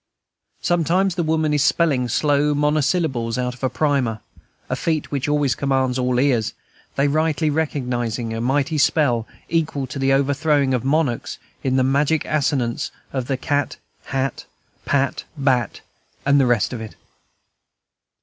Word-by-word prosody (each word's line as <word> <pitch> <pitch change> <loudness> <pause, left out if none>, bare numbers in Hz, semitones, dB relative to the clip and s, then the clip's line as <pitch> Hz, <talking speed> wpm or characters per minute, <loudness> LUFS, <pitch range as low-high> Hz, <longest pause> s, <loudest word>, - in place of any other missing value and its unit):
Sometimes 175 +2 +2
the 175 - -1
woman 155 -1 +1
is 145 -2 +2
spelling 140 -8 +2
slow 145 +3 +2
monosyllables 145 -5 +1
out 125 -1 -1
of 125 - -16
a 130 - +2
primer, 130 -4 0 0.5
a - - -1
feat 160 -3 -2
which 140 -1 -1
always 145 -3 +2
commands 130 -2 0
all 125 -1 +1
ears, 125 -5 +1 0.4
they 140 +1 +2
rightly 155 +1 +1
recognizing 125 -7 -2
a 115 - -3
mighty 140 +5 +1
spell, 130 -7 +2 0.2
equal 160 -4 -1
to 130 +2 -7
the 135 0 +2
overthrowing 140 0 +2
of 125 - 0
monarchs, 135 -3 0 0.3
in 130 -1 +1
the 130 - +3
magic 140 +4 +1
assonance 135 -5 0 0.2
of 130 -3 -2
cat, 145 0 -1 0.3
hat, 135 0 -2 0.4
pat, 140 -1 0
bat, 130 -5 0 0.4
and 140 +1 +4
the 135 - +3
rest 120 -1 +1
of 115 - -5
it. 110 - -8
140 Hz, 145 wpm, -21 LUFS, 125-150 Hz, 0.5 s, and